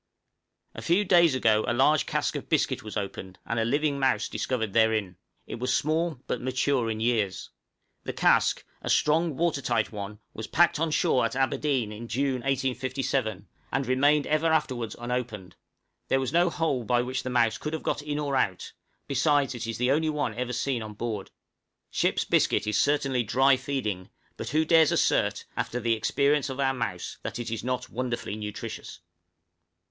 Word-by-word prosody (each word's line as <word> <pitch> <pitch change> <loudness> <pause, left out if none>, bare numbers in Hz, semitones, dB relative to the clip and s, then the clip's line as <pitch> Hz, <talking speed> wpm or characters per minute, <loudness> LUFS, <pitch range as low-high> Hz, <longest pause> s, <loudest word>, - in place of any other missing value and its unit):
_" - - -6
A - - -7
few 185 +5 +2
days 170 -6 +5
ago 110 -4 +3
a 120 - +1
large 150 +4 +3
cask - - -1
of - - -6
biscuit - - +1
was 110 0 -6
opened, 95 -2 -5
and 115 0 -1
a - - +2
living 145 +4 0
mouse 130 -5 +1
discovered 110 -1 -2
therein! 110 -5 +2 0.3
it - - -7
was 125 +1 +1
small, 160 -1 -1
but 125 - -3
mature 130 -1 0
in 110 -1 -3
years. 110 -5 -1 0.5
The - - -3
cask, - - +2 0.2
a - - -5
strong 155 -1 +2
watertight 140 -9 0
one, 105 -1 -6 0.2
was 110 - -6
packed 170 0 +3
on 165 0 +1
shore 135 -4 +2
at - - -1
Aberdeen, 135 -3 0
in 110 +2 -8
June, 130 +2 -1
1857, 130 -4 -1 0.2
and 135 +1 0
remained 140 +4 +3
ever 155 +2 +1
afterwards 130 -8 0
unopened; 120 -6 -4 0.5
there 135 - +2
was 130 +1 -2
no 175 +1 +4
hole 160 -7 -1
by 120 +2 +2
which 130 +1 -3
the 130 - -5
mouse 115 -3 +2
could 150 - -4
have 160 - -4
got - - -1
in 145 0 -3
or 145 -2 -1
out, 95 -7 -1 0.3
besides 140 0 +2
it 120 -1 -5
is 115 -1 -3
the 125 +2 +2
only 155 +2 +2
one 150 -7 -1
ever 125 +2 -3
seen 125 0 -1
on 110 -1 -7
board. 110 -3 -4 0.6
Ship's - - +1
biscuit - - +2
is 105 0 +1
certainly 140 -3 +1
dry 130 +5 +4
feeding, 130 -9 -3 0.3
but - - -6
who 155 +1 +2
dares 160 -1 +5
assert, - - +1
after 125 - -2
the 115 -1 +1
experience 140 +5 +1
of 130 +1 -6
our 135 -1 +2
mouse, 90 -8 -4
that - - -5
it 120 -1 -5
is 115 - -3
not 125 0 -3
wonderfully 120 -3 -3
nutritious? 105 -5 -7
130 Hz, 185 wpm, -27 LUFS, 115-145 Hz, 0.6 s, days